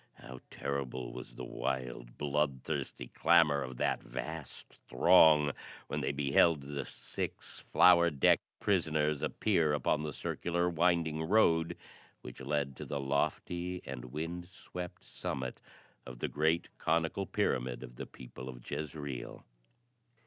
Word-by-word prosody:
How 65 Hz, 0 st, -10 dB
terrible 65 Hz, -3 st, -4 dB
was -, -, -9 dB
the 65 Hz, -, -6 dB
wild, 60 Hz, -2 st, -4 dB
bloodthirsty 70 Hz, -4 st, -2 dB
clamor 80 Hz, -4 st, +4 dB
of 65 Hz, -2 st, -6 dB
that -, -, 0 dB
vast 70 Hz, +5 st, -7 dB, 0.2 s
throng, 80 Hz, -4 st, +6 dB, 0.4 s
when -, -, -2 dB
they -, -, 0 dB
beheld 70 Hz, +2 st, +3 dB
the 70 Hz, 0 st, -5 dB
six -, -, -6 dB
flower 85 Hz, -1 st, +7 dB
decked 70 Hz, -5 st, +4 dB, 0.2 s
prisoners 80 Hz, -6 st, +1 dB
appear 85 Hz, -8 st, +2 dB
upon 75 Hz, +1 st, +1 dB
the 75 Hz, 0 st, -3 dB
circular 85 Hz, +5 st, -1 dB
winding 85 Hz, -2 st, +2 dB
road 80 Hz, -2 st, +3 dB, 0.4 s
which -, -, -10 dB
led 70 Hz, -3 st, -1 dB
to -, -, -6 dB
the 70 Hz, -, -2 dB
lofty 85 Hz, +6 st, -1 dB
and 65 Hz, -2 st, -6 dB
wind 80 Hz, +7 st, -5 dB
swept 90 Hz, -2 st, -8 dB
summit 65 Hz, -2 st, -5 dB, 0.4 s
of 60 Hz, 0 st, -9 dB
the -, -, -2 dB
great 80 Hz, +3 st, +1 dB
conical 80 Hz, +4 st, 0 dB
pyramid 60 Hz, -1 st, -1 dB
of -, -, -11 dB
the -, -, -6 dB
people 65 Hz, 0 st, -10 dB
of -, -, -10 dB
Jezreel. 75 Hz, -3 st, -5 dB
75 Hz, 130 wpm, -33 LUFS, 65-85 Hz, 0.4 s, flower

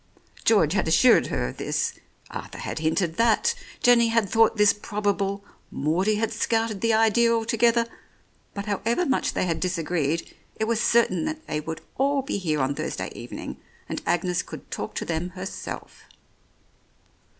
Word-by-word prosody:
George 190 Hz, -8 st, +4 dB
had 195 Hz, -4 st, +1 dB
assured 235 Hz, +9 st, +5 dB
her -, -, -1 dB
of -, -, -10 dB
this, -, -, -1 dB, 0.4 s
Arthur -, -, -7 dB
had -, -, -4 dB
hinted 160 Hz, +1 st, 0 dB
that, 235 Hz, -, +3 dB, 0.3 s
Jenny 240 Hz, -1 st, +6 dB
had 225 Hz, -2 st, +2 dB
thought 225 Hz, +2 st, +3 dB
this 210 Hz, -1 st, +6 dB
probable, 200 Hz, -1 st, -2 dB, 0.2 s
Maudie 180 Hz, +9 st, +1 dB
had 225 Hz, +1 st, -1 dB
scouted 225 Hz, -2 st, 0 dB
the 230 Hz, -, +2 dB
idea 225 Hz, +1 st, +4 dB
altogether, 230 Hz, +1 st, +2 dB, 0.7 s
but 200 Hz, 0 st, -4 dB
however 225 Hz, -, 0 dB
much 265 Hz, -4 st, 0 dB
they -, -, 0 dB
had 165 Hz, -2 st, -1 dB
disagreed, 165 Hz, -3 st, -1 dB, 0.2 s
it 220 Hz, -, -1 dB
was 230 Hz, 0 st, 0 dB
certain 210 Hz, -8 st, +3 dB
that 315 Hz, 0 st, -4 dB
they 150 Hz, -, -2 dB
would 160 Hz, +1 st, -6 dB, 0.2 s
all 275 Hz, 0 st, +2 dB
be 270 Hz, -6 st, -2 dB
here 155 Hz, -6 st, 0 dB
on 135 Hz, +2 st, +1 dB
Thursday -, -, -4 dB
evening, -, -, -7 dB, 0.3 s
and -, -, -4 dB
Agnes 180 Hz, +1 st, +1 dB
could 155 Hz, -5 st, -11 dB
talk -, -, -5 dB
to -, -, -3 dB
them 170 Hz, +2 st, -2 dB
herself. 190 Hz, +2 st, -7 dB
205 Hz, 160 wpm, -25 LUFS, 175-230 Hz, 0.7 s, Jenny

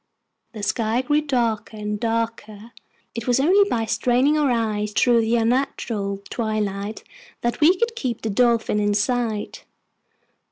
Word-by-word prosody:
The 215 Hz, -2 st, -7 dB
sky 225 Hz, +3 st, 0 dB
grew 295 Hz, +3 st, +2 dB
darker 230 Hz, -6 st, -1 dB
and 210 Hz, 0 st, -4 dB
darker. 230 Hz, -1 st, -3 dB, 0.4 s
It 230 Hz, +1 st, -6 dB
was 245 Hz, +1 st, +3 dB
only 390 Hz, +8 st, +4 dB
by 225 Hz, -7 st, 0 dB
straining 245 Hz, +6 st, +2 dB
our 300 Hz, -2 st, +2 dB
eyes 215 Hz, -3 st, -1 dB
through 235 Hz, +1 st, +4 dB
the 225 Hz, +1 st, +1 dB
unnatural 225 Hz, -4 st, -1 dB
twilight 215 Hz, -2 st, -3 dB, 0.4 s
that 240 Hz, +5 st, -2 dB
we 345 Hz, +5 st, +5 dB
could 465 Hz, +2 st, -1 dB
keep 250 Hz, -, -3 dB
the 220 Hz, -, -1 dB
Dolphin 230 Hz, -1 st, +2 dB
in 205 Hz, 0 st, +1 dB
sight. 225 Hz, -1 st, -1 dB
230 Hz, 145 wpm, -22 LUFS, 215-250 Hz, 0.4 s, we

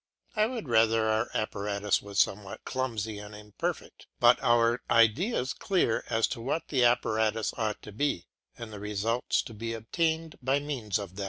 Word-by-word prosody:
I 215 Hz, 0 st, +3 dB
would 230 Hz, -, -5 dB
rather 115 Hz, -1 st, +3 dB
our 110 Hz, 0 st, +1 dB
apparatus 105 Hz, -1 st, 0 dB
was 100 Hz, -1 st, -8 dB
somewhat 100 Hz, -1 st, 0 dB
clumsy 110 Hz, -5 st, -3 dB
and 105 Hz, 0 st, -9 dB
imperfect, 105 Hz, 0 st, -5 dB
but -, -, +6 dB
our 120 Hz, 0 st, +3 dB
ideas 125 Hz, -, +3 dB
clear 180 Hz, -, +1 dB
as 115 Hz, 0 st, +3 dB
to 115 Hz, -, -5 dB
what 140 Hz, +7 st, -2 dB
the 130 Hz, -4 st, +2 dB
apparatus 110 Hz, -2 st, +2 dB
ought 110 Hz, -2 st, -2 dB
to 105 Hz, -, -9 dB
be, 105 Hz, -6 st, -1 dB, 0.3 s
and 115 Hz, -2 st, -8 dB
the 105 Hz, -, -7 dB
results 105 Hz, +4 st, 0 dB
to 115 Hz, -, -9 dB
be 115 Hz, +1 st, -4 dB
obtained 160 Hz, +7 st, -1 dB
by 135 Hz, +2 st, +2 dB
means 130 Hz, -9 st, -2 dB
of 100 Hz, -4 st, -6 dB
it. 95 Hz, -, -11 dB
115 Hz, 170 wpm, -29 LUFS, 105-130 Hz, 0.3 s, but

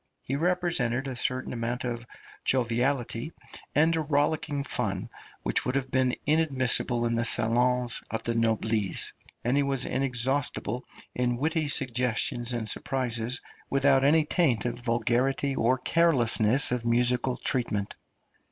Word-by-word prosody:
He 135 Hz, -, -3 dB
represented 155 Hz, -7 st, 0 dB
a 130 Hz, -, -4 dB
certain 130 Hz, +1 st, -2 dB
amount 120 Hz, +1 st, -3 dB
of 120 Hz, -1 st, -4 dB, 0.4 s
joviality 125 Hz, +2 st, 0 dB, 0.4 s
and 160 Hz, +3 st, +4 dB
rollicking 145 Hz, 0 st, 0 dB
fun -, -, -3 dB, 0.3 s
which -, -, 0 dB
would 125 Hz, -, -2 dB
have 135 Hz, -1 st, -2 dB
been 130 Hz, -1 st, +2 dB
inadmissible 130 Hz, -6 st, +2 dB
in 115 Hz, -, 0 dB
the 115 Hz, 0 st, 0 dB
salons 120 Hz, +1 st, +1 dB
of 115 Hz, -, -4 dB
the 115 Hz, -, -1 dB
noblesse, 110 Hz, -2 st, 0 dB, 0.3 s
and 120 Hz, +3 st, +1 dB
he 145 Hz, -, +3 dB
was 140 Hz, -2 st, 0 dB
inexhaustible 130 Hz, -1 st, -1 dB, 0.3 s
in 125 Hz, -1 st, 0 dB
witty 155 Hz, +3 st, 0 dB
suggestions 125 Hz, -2 st, 0 dB
and 120 Hz, -3 st, -3 dB
surprises, 120 Hz, 0 st, -1 dB, 0.3 s
without 135 Hz, -1 st, +3 dB
any 150 Hz, +2 st, +4 dB
taint 140 Hz, -, +1 dB
of 120 Hz, 0 st, -3 dB
vulgarity 125 Hz, +4 st, 0 dB
or 125 Hz, +1 st, +2 dB
carelessness 130 Hz, -6 st, +4 dB
of 125 Hz, -2 st, -1 dB
musical 125 Hz, +2 st, +2 dB
treatment. 105 Hz, -6 st, -1 dB
125 Hz, 130 wpm, -27 LUFS, 120-140 Hz, 0.4 s, and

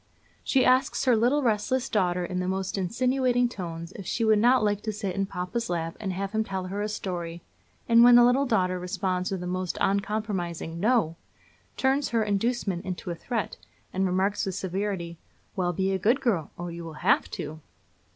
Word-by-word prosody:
She 265 Hz, -, +3 dB
asks 255 Hz, +2 st, +3 dB
her 250 Hz, -2 st, +5 dB
little 250 Hz, +6 st, +2 dB
restless 245 Hz, +3 st, +1 dB
daughter 180 Hz, -3 st, +1 dB
in 180 Hz, +1 st, -3 dB
the 180 Hz, -, -2 dB
most 190 Hz, 0 st, -2 dB
insinuating 245 Hz, +5 st, +1 dB
tones 170 Hz, -6 st, -6 dB
if 195 Hz, -2 st, -9 dB
she 230 Hz, -, 0 dB
would 215 Hz, -1 st, +4 dB
not 245 Hz, +2 st, +4 dB
like 205 Hz, -1 st, +1 dB
to 215 Hz, -, -2 dB
sit 200 Hz, -3 st, -4 dB
in 195 Hz, 0 st, 0 dB
papa's 190 Hz, +6 st, -3 dB
lap 165 Hz, -1 st, -2 dB
and 200 Hz, -3 st, -3 dB
have 195 Hz, +1 st, -3 dB
him 220 Hz, 0 st, +1 dB
tell 190 Hz, -3 st, -4 dB
her 195 Hz, +3 st, -4 dB
a 210 Hz, -, -1 dB
story; 175 Hz, -5 st, -5 dB, 0.4 s
and 230 Hz, 0 st, +7 dB
when 245 Hz, 0 st, +8 dB
the 240 Hz, -, +8 dB
little 255 Hz, +3 st, +3 dB
daughter 185 Hz, -6 st, +1 dB
responds 185 Hz, 0 st, -2 dB
with 190 Hz, -2 st, -3 dB
a -, -, -4 dB
most 185 Hz, 0 st, -2 dB
uncompromising 195 Hz, -5 st, -1 dB
'no!' 210 Hz, -6 st, +2 dB, 0.6 s
turns 270 Hz, +2 st, +1 dB
her 230 Hz, -2 st, +1 dB
inducement 205 Hz, -3 st, -1 dB
into 180 Hz, -1 st, -5 dB
a -, -, -3 dB
threat, 225 Hz, +5 st, -3 dB, 0.4 s
and 190 Hz, +1 st, +1 dB
remarks 190 Hz, +3 st, 0 dB
with 190 Hz, -2 st, -3 dB
severity: 190 Hz, -3 st, -3 dB, 0.4 s
'Well, 180 Hz, -2 st, 0 dB
be 190 Hz, +3 st, 0 dB
a 190 Hz, -, 0 dB
good 230 Hz, +8 st, +3 dB
girl, 210 Hz, -, 0 dB
or 175 Hz, 0 st, -5 dB
you 170 Hz, 0 st, -7 dB
will 160 Hz, -2 st, -9 dB
have -, -, +3 dB
to!' 155 Hz, +1 st, -6 dB
195 Hz, 195 wpm, -27 LUFS, 180-230 Hz, 0.6 s, when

